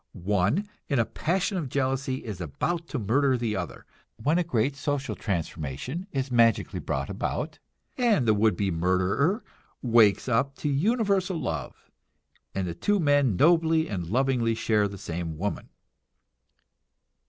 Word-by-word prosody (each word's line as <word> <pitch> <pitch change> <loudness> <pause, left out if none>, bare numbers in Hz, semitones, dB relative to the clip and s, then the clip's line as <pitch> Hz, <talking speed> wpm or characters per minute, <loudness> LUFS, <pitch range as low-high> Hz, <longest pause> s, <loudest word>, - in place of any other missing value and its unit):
One 105 - 0 0.2
in 140 - 0
a 115 - +3
passion 185 - -1
of 145 -6 -4
jealousy 130 0 -1
is 100 -5 -6
about 165 - -2
to 150 - -4
murder 130 +5 +2
the 115 -3 -1
other, 90 -3 -5 0.3
when 150 +10 +1
a - - +2
great 135 -3 0
social 145 -1 -2
transformation 85 - -4
is 135 -1 -2
magically 115 -3 +3
brought 70 0 -3
about, - - -3 0.4
and 215 - +3
the 110 - +5
would 105 +1 +3
be 100 -2 0
murderer 95 - +1 0.4
wakes 115 -4 +4
up 130 +3 +1
to 150 - -2
universal 195 - +1
love, 75 -4 -5 0.6
and 95 -1 -1
the 85 - -3
two 205 - +1
men 145 - +3
nobly 160 - +4
and 90 - -4
lovingly 120 +1 +1
share 105 -2 +2
the 100 0 -8
same 85 -4 -5
woman. 100 +5 -3
125 Hz, 145 wpm, -27 LUFS, 100-155 Hz, 0.6 s, the